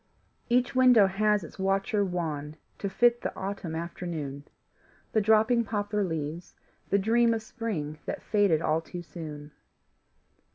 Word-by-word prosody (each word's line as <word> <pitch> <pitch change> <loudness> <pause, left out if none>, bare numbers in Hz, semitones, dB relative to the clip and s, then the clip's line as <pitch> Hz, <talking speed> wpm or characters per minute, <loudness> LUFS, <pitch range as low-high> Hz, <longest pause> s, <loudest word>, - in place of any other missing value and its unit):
Each 250 +1 +2
window 250 -5 +6
has 210 +1 +1
its 165 - -11
watcher 195 +2 +1
wan 155 -5 -3 0.2
To 200 - -2
fit 240 +5 +3
the - - -2
autumn 190 -4 -4
afternoon, 160 -4 -5 0.7
The 220 - +2
dropping 220 +3 +4
poplar 205 -1 -1
leaves, 160 -1 -4 0.3
the 200 - +3
dream 230 +3 +3
Of 220 - -4
spring 180 -11 -4
that - - -4
faded 200 -7 +2
all 155 +1 +1
too 175 +1 -8
soon. 150 -3 -8
195 Hz, 135 wpm, -28 LUFS, 160-220 Hz, 0.7 s, window